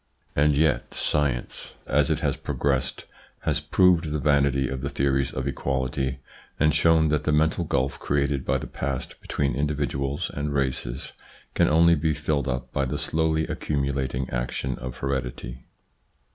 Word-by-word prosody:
And 75 0 +3
yet 80 +1 +1
science, 70 -5 -1
as - - +2
it - - 0
has - - +1
progressed, 70 -2 -1 0.4
has - - +1
proved 90 -4 +3
the 75 - -1
vanity 70 -2 +2
of 65 0 -4
the 70 - -2
theories 70 -2 +1
of 65 +1 -3
equality 65 -1 -1 0.4
and 75 0 +4
shown 80 0 +4
that 75 -1 +1
the 75 - +1
mental 80 +3 +2
gulf 70 -3 0
created 70 -1 0
by - - +1
the - - -6
past 70 -2 -4
between 70 -2 -1
indi 75 +3 0
viduals 70 -1 -2
and 70 0 -3
races 65 -2 -2 0.4
can - - +3
only 85 +2 +6
be 80 -1 +1
filled 75 -2 -1
up 60 -1 -3
by 70 - +1
the 65 - -2
slowly 80 0 0
accumulating 70 -3 -2
action 60 +1 -2
of 65 0 -6
heredity. 65 -2 -3
70 Hz, 160 wpm, -25 LUFS, 65-75 Hz, 0.4 s, only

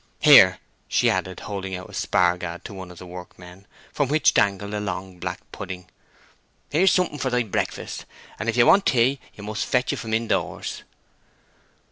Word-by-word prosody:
Here," - - +8 0.3
she - - +3
added, 95 0 -3
holding 95 -2 -5
out 90 0 -8
a - - -15
spar 90 -1 +2
gad 90 -1 -7
to - - -7
one 95 -2 -8
of 90 - -13
the 90 - -10
workmen, 90 +1 -12 0.3
from 145 -3 0
which 155 +2 +3
dangled 100 +1 +1
a 105 - -1
long 95 -2 -5
black 90 +1 -5
pudding—"here's 95 - -4
something 180 -5 +1
for 130 - 0
thy 125 -1 +1
breakfast, 105 - -4 0.3
and 115 - -2
if 115 - -1
you 120 - +6
want 195 - +5
tea 130 +2 +3 0.2
you 100 - -10
must 110 +1 -3
fetch 125 - 0
it - - -4
from 110 -1 -2
in 115 +1 -1
doors." 90 -6 -2
100 Hz, 180 wpm, -24 LUFS, 90-120 Hz, 0.3 s, Here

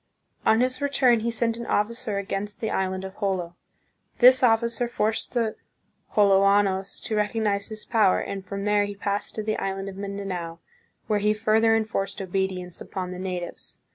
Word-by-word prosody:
On 220 +2 +5
his 255 +1 0
re 285 - +1
turn 250 -4 +4
he 230 +2 -1
sent 230 0 0
an 235 - -6
officer 210 0 -1
against 200 +1 -4
the 220 - -2
island 190 0 -1
of 190 0 -9
Jolo. 185 -4 -2 0.6
This 255 +1 +7
officer 235 0 +2
forced 220 -1 -1
the 225 -3 0 0.6
Joloanos 195 -1 +3
to 220 - -3
recognize 210 -1 0
his 215 -1 -6
power, 215 -5 +3
and 195 -1 -5
from 200 +1 -5
there 210 0 +3
he 205 0 -6
passed 200 0 -2
to 215 - -3
the 215 0 -1
island 195 0 -3
of 190 - -10
Mindanao, 195 -4 -5 0.5
where 210 -1 +1
he 210 +1 +2
further 220 +1 +3
enforced 215 -3 -2
obedience 185 -2 -3
upon 185 -1 -5
the 180 - -6
natives. 180 -2 -5
205 Hz, 170 wpm, -25 LUFS, 195-225 Hz, 0.6 s, This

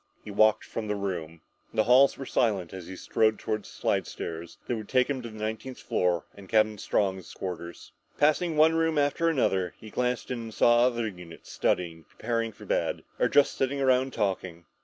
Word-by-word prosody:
He 105 - -7
walked 110 +1 +4
from 110 -2 -5
the 105 - -1
room. 85 -5 -4 0.3
The 110 - +4
halls 130 +4 +5
were 135 - -6
silent 100 -9 0
as 95 -3 -8
he 95 - -7
strode 110 +3 +1
toward 110 -1 -3
the - - -10
slidestairs 85 +1 -3
that 120 - -1
would 110 -2 -7
take 125 -1 +3
him 140 -3 -2
to 115 - -7
the 110 - -11
nineteenth 110 +4 -4
floor 90 -2 0
and 100 -2 -14
Captain 110 -1 +3
Strong's 95 -4 -1
quarters. 85 -2 -7 0.3
Passing 155 +2 +2
one 160 +1 +6
room 165 -1 +1
after 145 +3 +2
another, 95 - +1
he 110 - -12
glanced 125 0 -1
in 125 - -2
and 115 -1 -7
saw 120 +1 +5
other 120 -2 -1
units 90 -5 -10
studying, 85 -2 -1
preparing 115 0 -2
for - - -14
bed, - - -1 0.2
or - - +4
just 145 0 +3
sitting 135 +1 -1
around 130 0 +3
talking. 95 -5 -2
110 Hz, 195 wpm, -28 LUFS, 95-130 Hz, 0.3 s, one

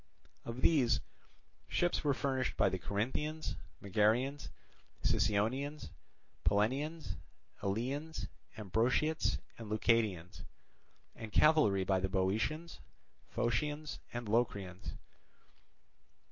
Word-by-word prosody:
Of 120 +2 -5
these, 125 -8 +4 0.7
ships 175 0 +1
were 145 -3 +2
furnished 130 -2 -1
by - - +4
the 95 - -3
Corinthians, 130 - -2 0.3
Megarians, 110 +8 +2 0.5
Sicyonians, 130 +9 +1 0.5
Pellenians, 130 - +1 0.4
Eleans, 135 +11 -2 0.3
Ambraciots, 120 - +1 0.2
and 110 -2 -7
Leucadians; 105 -5 +1 0.7
and 110 -2 -7
cavalry 130 -12 +5
by 95 0 +2
the 95 +1 -1
Boeotians, 110 - 0 0.5
Phocians, 145 +6 -1
and 120 -2 -4
Locrians. 100 -5 -1
120 Hz, 85 wpm, -34 LUFS, 100-145 Hz, 0.7 s, cavalry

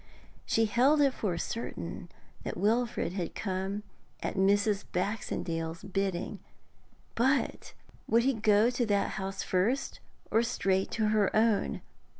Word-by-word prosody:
She 225 - +3
held 255 +8 +4
it 280 -2 +4
for 185 -9 -2
certain 230 +7 -5 0.3
that - - -5
Wilfrid 220 -4 +1
had 180 -4 -4
come 195 +1 -3 0.4
at - - -1
Mrs. 200 +1 +2
Baxendale's 170 -4 -2
bidding. 195 -2 -2 0.7
But 265 +4 0 0.3
would 230 +1 +4
he 270 +2 +3
go 215 +1 +4
to 245 -1 0
that 200 -1 +2
house 195 0 -4
first, 210 +9 0 0.3
or 225 - +4
straight 195 -5 0
to 220 -2 +1
her 215 -2 +3
own? 220 -1 +2
210 Hz, 130 wpm, -30 LUFS, 190-230 Hz, 0.7 s, held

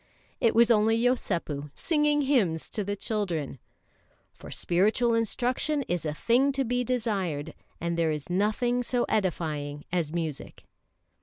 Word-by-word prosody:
It 230 - +2
was 235 +1 +6
only 225 0 +4
Yosépu 175 - -1
singing 295 -2 +2
hymns 210 - +1
to 210 - -2
the 205 +1 -2
children. 180 - -3 0.7
"For - - -12
spiritual 215 +7 +2
instruction 250 +6 0
is 175 -7 -2
a 150 - -2
thing 250 - +3
to 270 0 0
be 245 0 0
desired, 195 - -2 0.3
and 170 0 -2
there 165 -1 +1
is 150 -2 -3
nothing 215 +7 +1
so 245 0 +1
edifying 150 -7 -2
as 170 -4 0
music." 160 -4 -5
210 Hz, 140 wpm, -27 LUFS, 165-245 Hz, 0.7 s, was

